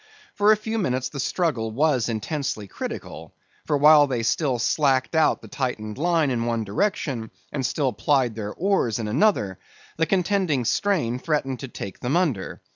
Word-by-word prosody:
For 205 Hz, +1 st, +4 dB
a 215 Hz, -, +5 dB
few 220 Hz, +1 st, -3 dB
minutes 130 Hz, -9 st, -1 dB
the 140 Hz, -, -7 dB
struggle 130 Hz, -6 st, 0 dB
was 130 Hz, 0 st, +1 dB
intensely 115 Hz, -1 st, -3 dB
critical; 80 Hz, -4 st, -7 dB, 0.3 s
for 145 Hz, -, +2 dB
while 150 Hz, 0 st, +7 dB
they 125 Hz, -4 st, -2 dB
still 130 Hz, +1 st, +1 dB
slacked 135 Hz, +3 st, +1 dB
out 160 Hz, -1 st, +2 dB
the -, -, -10 dB
tightened 125 Hz, -5 st, -4 dB
line 165 Hz, -3 st, +2 dB
in 115 Hz, -2 st, -1 dB
one 115 Hz, -1 st, -1 dB
direction, 115 Hz, -, -2 dB, 0.2 s
and 135 Hz, -, -2 dB
still 130 Hz, -1 st, 0 dB
plied 125 Hz, +3 st, +1 dB
their 105 Hz, -1 st, -5 dB
oars 185 Hz, -, 0 dB
in 110 Hz, -2 st, -3 dB
another, 110 Hz, -, +1 dB, 0.4 s
the 165 Hz, 0 st, +1 dB
contending 185 Hz, -, +1 dB
strain 135 Hz, -, 0 dB
threatened 135 Hz, -4 st, -1 dB
to 135 Hz, -, -6 dB
take 100 Hz, -5 st, -8 dB
them 130 Hz, +7 st, 0 dB
under. 145 Hz, -, -1 dB
135 Hz, 170 wpm, -24 LUFS, 115-160 Hz, 0.4 s, while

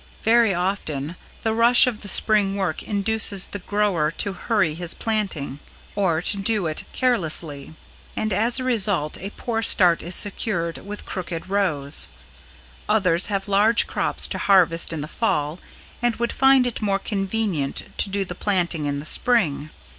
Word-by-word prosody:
Very 230 Hz, -1 st, +4 dB
often 175 Hz, -5 st, -3 dB, 0.3 s
the 220 Hz, -, 0 dB
rush 235 Hz, +2 st, +6 dB
of 235 Hz, -4 st, -3 dB
the 205 Hz, -, -9 dB
Spring 205 Hz, -1 st, +1 dB
work 190 Hz, -6 st, -2 dB
induces 205 Hz, -1 st, +1 dB
the 205 Hz, -, -7 dB
grower 195 Hz, -6 st, 0 dB
to 195 Hz, +4 st, -2 dB
hurry 190 Hz, -4 st, 0 dB
his 170 Hz, +1 st, -4 dB
planting, 190 Hz, -, -3 dB, 0.4 s
or 175 Hz, -5 st, 0 dB
to 200 Hz, -, +5 dB
do 205 Hz, -1 st, +1 dB
it 155 Hz, -1 st, -3 dB
carelessly; 160 Hz, -, 0 dB, 0.4 s
and 215 Hz, -2 st, -1 dB
as 235 Hz, +6 st, +2 dB
a -, -, -3 dB
result 205 Hz, -11 st, +1 dB
a 195 Hz, -, -6 dB
poor 225 Hz, +1 st, -4 dB
start 180 Hz, -6 st, +3 dB
is 175 Hz, +2 st, -1 dB
secured, 180 Hz, -5 st, -1 dB
with 205 Hz, +1 st, -9 dB
crooked 180 Hz, -1 st, -6 dB
rows. 155 Hz, -9 st, 0 dB, 0.8 s
Others 185 Hz, -5 st, +2 dB
have 195 Hz, -1 st, -3 dB
large 210 Hz, +3 st, +3 dB
crops -, -, -1 dB
to -, -, -4 dB
harvest 175 Hz, -5 st, +3 dB
in 160 Hz, -2 st, -4 dB
the 150 Hz, -, -5 dB
Fall 155 Hz, -5 st, -2 dB, 0.4 s
and 240 Hz, -1 st, +1 dB
would 235 Hz, 0 st, -2 dB
find 270 Hz, -1 st, +4 dB
it 245 Hz, -2 st, -3 dB
more 200 Hz, -2 st, +1 dB
convenient 195 Hz, -7 st, -2 dB
to -, -, +3 dB
do 195 Hz, 0 st, -1 dB
the 180 Hz, -, -6 dB
planting 175 Hz, -5 st, -1 dB
in 140 Hz, 0 st, -2 dB
the 145 Hz, -, -8 dB
Spring. 155 Hz, -, +1 dB
195 Hz, 160 wpm, -22 LUFS, 165-215 Hz, 0.8 s, rush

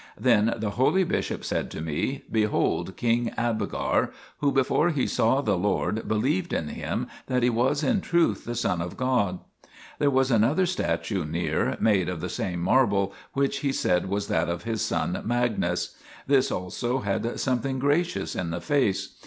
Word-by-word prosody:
Then 115 Hz, -3 st, +3 dB
the 105 Hz, -2 st, -2 dB
holy 135 Hz, -, +3 dB
bishop -, -, -2 dB
said -, -, -1 dB
to -, -, -7 dB
me: 80 Hz, -, -2 dB
" -, -, -23 dB
Behold 105 Hz, -3 st, 0 dB
King 120 Hz, 0 st, +1 dB
Abgar, 115 Hz, -2 st, 0 dB, 0.3 s
who 140 Hz, -1 st, +2 dB
before 135 Hz, +5 st, +2 dB
he 150 Hz, -6 st, 0 dB
saw 130 Hz, +5 st, +2 dB
the 105 Hz, -8 st, +1 dB
Lord 100 Hz, +3 st, -1 dB
believed 150 Hz, +12 st, 0 dB
in 75 Hz, -, -1 dB
Him -, -, -3 dB, 0.2 s
that 125 Hz, -1 st, +1 dB
He 120 Hz, -, +4 dB
was 130 Hz, +6 st, +1 dB
in 190 Hz, +7 st, +2 dB
truth 170 Hz, -2 st, +1 dB
the 120 Hz, -, -4 dB
Son 90 Hz, -7 st, 0 dB
of 85 Hz, 0 st, -5 dB
God." 125 Hz, -8 st, +1 dB, 0.6 s
There 145 Hz, -, +3 dB
was 135 Hz, -1 st, +2 dB
another 125 Hz, -, +3 dB
statue 115 Hz, -, -1 dB
near, 80 Hz, +3 st, -1 dB
made 95 Hz, -5 st, +2 dB
of 90 Hz, -2 st, -4 dB
the -, -, -4 dB
same 90 Hz, -2 st, -3 dB
marble, 100 Hz, -2 st, +2 dB, 0.2 s
which 140 Hz, 0 st, 0 dB
he 140 Hz, -, 0 dB
said 90 Hz, -8 st, +1 dB
was 100 Hz, +1 st, -1 dB
that 85 Hz, +1 st, +1 dB
of 85 Hz, 0 st, -3 dB
his 115 Hz, -1 st, -2 dB
son -, -, -1 dB
Magnus; 120 Hz, -1 st, 0 dB, 0.3 s
this 135 Hz, -1 st, +3 dB
also 120 Hz, +8 st, -2 dB
had 105 Hz, +3 st, -2 dB
something 130 Hz, 0 st, 0 dB
gracious 145 Hz, -, 0 dB
in 90 Hz, -, -2 dB
the 85 Hz, +1 st, -3 dB
face. 130 Hz, -5 st, 0 dB
115 Hz, 175 wpm, -26 LUFS, 100-135 Hz, 0.6 s, He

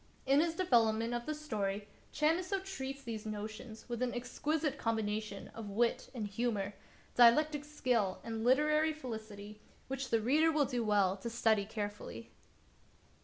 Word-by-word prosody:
In 275 Hz, +2 st, +5 dB
his 330 Hz, +1 st, +1 dB
development 230 Hz, -9 st, +3 dB
of 240 Hz, 0 st, -3 dB
the 305 Hz, -, -1 dB
story 210 Hz, -9 st, -3 dB, 0.2 s
Chamisso 345 Hz, +6 st, +1 dB
treats 275 Hz, -8 st, -5 dB
these 225 Hz, -4 st, -5 dB
notions 215 Hz, +1 st, -7 dB
with 240 Hz, -1 st, -4 dB
an 250 Hz, -1 st, 0 dB
exquisite 290 Hz, +4 st, -1 dB
combination 215 Hz, -2 st, -2 dB
of 220 Hz, -2 st, -8 dB
wit 230 Hz, +4 st, +1 dB
and 225 Hz, -3 st, -2 dB
humor, 205 Hz, -1 st, -1 dB, 0.4 s
dialectic 290 Hz, +5 st, +5 dB
skill 250 Hz, -10 st, 0 dB
and 225 Hz, -1 st, -4 dB
literary 305 Hz, +5 st, +4 dB
felicity, 215 Hz, -6 st, -7 dB, 0.3 s
which 270 Hz, 0 st, -3 dB
the 230 Hz, -, +3 dB
reader 300 Hz, +9 st, +4 dB
will 300 Hz, -2 st, +3 dB
do 245 Hz, -3 st, -1 dB
well 200 Hz, -3 st, +3 dB
to 215 Hz, +5 st, -5 dB
study 220 Hz, -3 st, +2 dB
carefully. 205 Hz, -, -6 dB
235 Hz, 145 wpm, -34 LUFS, 215-290 Hz, 0.4 s, In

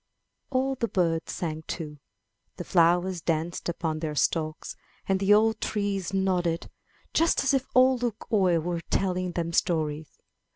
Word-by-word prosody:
'* -, -, -54 dB
All 270 Hz, 0 st, +1 dB
the 240 Hz, -3 st, -2 dB
birds 165 Hz, -5 st, 0 dB
sang 160 Hz, -2 st, -4 dB
too, 150 Hz, -3 st, -6 dB, 0.6 s
the -, -, -4 dB
flowers 175 Hz, +1 st, +2 dB
danced 165 Hz, +2 st, -2 dB
upon 160 Hz, -2 st, -2 dB
their 155 Hz, -2 st, -3 dB
stalks, 155 Hz, +1 st, -1 dB, 0.3 s
and 195 Hz, -1 st, +2 dB
the 195 Hz, +1 st, +2 dB
old 220 Hz, +1 st, +4 dB
trees 200 Hz, -4 st, -2 dB
nodded, 180 Hz, -3 st, 0 dB, 0.4 s
just 330 Hz, 0 st, +3 dB
as 270 Hz, -, +2 dB
if 270 Hz, -1 st, +1 dB
Ole 255 Hz, 0 st, +6 dB
Luk 235 Hz, -3 st, -3 dB
oie 185 Hz, -5 st, +4 dB
were 170 Hz, +1 st, -3 dB
telling 185 Hz, -2 st, 0 dB
them 170 Hz, -1 st, -2 dB
stories. 155 Hz, -3 st, -1 dB
180 Hz, 155 wpm, -27 LUFS, 165-205 Hz, 0.6 s, Ole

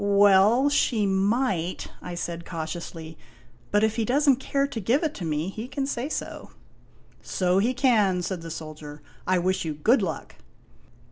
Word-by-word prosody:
" -, -, -3 dB
Well, 200 Hz, +5 st, +5 dB
she 230 Hz, -6 st, +2 dB
might," 195 Hz, -2 st, 0 dB
I 180 Hz, -, -6 dB
said, 170 Hz, -1 st, -4 dB
cautiously, 160 Hz, -1 st, -6 dB, 0.3 s
" 120 Hz, 0 st, -30 dB
But 205 Hz, +1 st, +3 dB
if 220 Hz, +1 st, +1 dB
he 230 Hz, -, +1 dB
does 280 Hz, +7 st, +1 dB
n't 270 Hz, -2 st, +5 dB
care 275 Hz, +1 st, 0 dB
to 275 Hz, -5 st, -5 dB
give 235 Hz, -, +1 dB
it 310 Hz, -2 st, -1 dB
to 180 Hz, -, -6 dB
me, 155 Hz, +2 st, -1 dB
he 220 Hz, +4 st, -6 dB
can 270 Hz, +1 st, -3 dB
say 270 Hz, 0 st, -3 dB
so." -, -, -5 dB, 0.4 s
" -, -, -31 dB
So 180 Hz, 0 st, +1 dB
he 240 Hz, +5 st, +1 dB
can," 210 Hz, -8 st, +2 dB
said 180 Hz, -1 st, -3 dB
the 165 Hz, -, -8 dB
soldier. 155 Hz, -2 st, -8 dB
" -, -, -27 dB
I 185 Hz, 0 st, +3 dB
wish 185 Hz, +2 st, 0 dB
you 155 Hz, -2 st, -3 dB
good 220 Hz, -, +3 dB
luck." 165 Hz, -6 st, -5 dB
195 Hz, 195 wpm, -25 LUFS, 170-240 Hz, 0.4 s, Well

